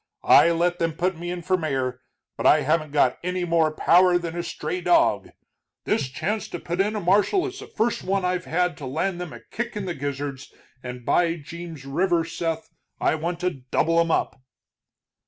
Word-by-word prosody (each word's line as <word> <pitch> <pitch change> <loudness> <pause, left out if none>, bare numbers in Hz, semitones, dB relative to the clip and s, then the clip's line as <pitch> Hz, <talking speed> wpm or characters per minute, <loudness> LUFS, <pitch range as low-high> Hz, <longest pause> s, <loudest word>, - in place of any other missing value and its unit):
I - - +7
let 175 +1 +1
them 165 -1 0
put 180 +3 -1
me 175 +1 -5
in 175 -1 -4
for 185 +1 +1
mayor, 130 -6 -2 0.3
but - - +1
I - - +6
haven't 155 +1 +1
got 135 -4 +2
any 180 0 -1
more 165 -2 +2
power 175 +3 +4
than 170 -1 -5
a 175 - -1
stray 180 +1 -4
dog. 335 - +3 0.5
This 210 -11 0
chance 190 +10 -2
to 175 - -6
put 175 +3 -1
in 210 +2 0
a - - -1
marshal 205 - +3
is 385 0 -6
the - - -9
first 230 +2 -1
one 195 0 0
I've 180 0 -1
had 180 +2 0
to 140 - -7
land 175 +6 -2
them 175 -3 -6
a - - -10
kick 235 -1 -4
in 200 - -3
the 180 - -2
gizzards, 140 -1 -5 0.3
and 125 -1 -8
by 170 -1 +2
Jeems 165 -1 -9
River, 170 +4 +1
Seth, 165 -1 -4 0.3
I - - +2
want 170 +2 -3
to 180 0 +1 0.2
double 165 +4 +2
'em 165 0 +2
up!" 135 - 0
170 Hz, 200 wpm, -24 LUFS, 155-180 Hz, 0.5 s, I